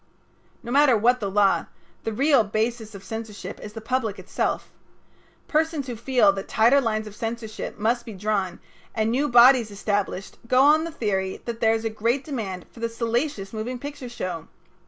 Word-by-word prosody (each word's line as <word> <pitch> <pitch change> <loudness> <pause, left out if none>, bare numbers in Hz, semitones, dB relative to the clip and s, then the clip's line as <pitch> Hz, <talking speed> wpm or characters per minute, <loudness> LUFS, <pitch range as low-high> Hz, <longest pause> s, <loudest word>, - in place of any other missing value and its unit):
No 235 - -6
matter 275 -3 +5
what 245 +4 +3
the 200 - -2
law, 200 0 +3 0.4
the 225 - -1
real 270 +2 +4
basis 220 +1 -2
of 195 - -10
censorship 215 -3 -7
is 210 - -9
the 225 - -7
public 225 -3 -1
itself. - - -2 0.8
Persons 315 -2 0
who 245 -2 -5
feel 230 -3 +3
that 195 0 -6
tighter 240 +6 +4
lines 220 -3 -1
of 210 -1 -10
censorship 225 -1 -5
must 235 +3 +1
be 225 - -8
drawn 195 -2 -2 0.4
and 220 0 +1
new 275 +5 +1
bodies 240 -1 +7
established 200 -1 -3
go 255 +2 +3
on 300 +4 +5
the 335 - -5
theory 195 -9 -2
that 235 -1 -4
there 225 -1 +4
is 225 0 -4
a - - +1
great 230 +5 0
demand 205 - -5
for - - -15
the 230 0 -1
salacious 230 -2 -2
moving 230 +4 -4
picture 280 -1 -7
show. 185 -8 -5
225 Hz, 180 wpm, -24 LUFS, 210-250 Hz, 0.8 s, bodies